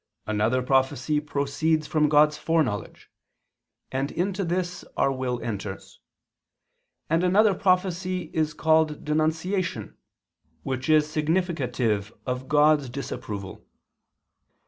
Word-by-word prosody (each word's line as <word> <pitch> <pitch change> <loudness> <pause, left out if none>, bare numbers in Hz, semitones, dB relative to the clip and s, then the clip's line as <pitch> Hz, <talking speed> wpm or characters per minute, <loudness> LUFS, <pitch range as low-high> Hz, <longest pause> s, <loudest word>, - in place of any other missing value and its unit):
Another 110 +4 +1
prophecy 135 +3 +1
proceeds 150 +2 0
from 150 -1 +2
God's 150 0 +5
foreknowledge: 155 -11 -2 0.8
and 135 +2 -2
into 190 +2 -1
this 180 0 -2
our 135 - +3
will 130 -2 -2
enters. 100 -3 -6 1.1
And 165 +2 +1
another 200 +3 +4
prophecy 185 -2 0
is 155 -1 0
called 160 -2 +2
denunciation, 160 +5 -1 0.7
which 130 +2 -3
is 155 -1 +5
significative 150 - -1
of 125 0 -3
God's 150 -2 +4
disapproval." 105 -6 -6
150 Hz, 100 wpm, -25 LUFS, 130-165 Hz, 1.1 s, God's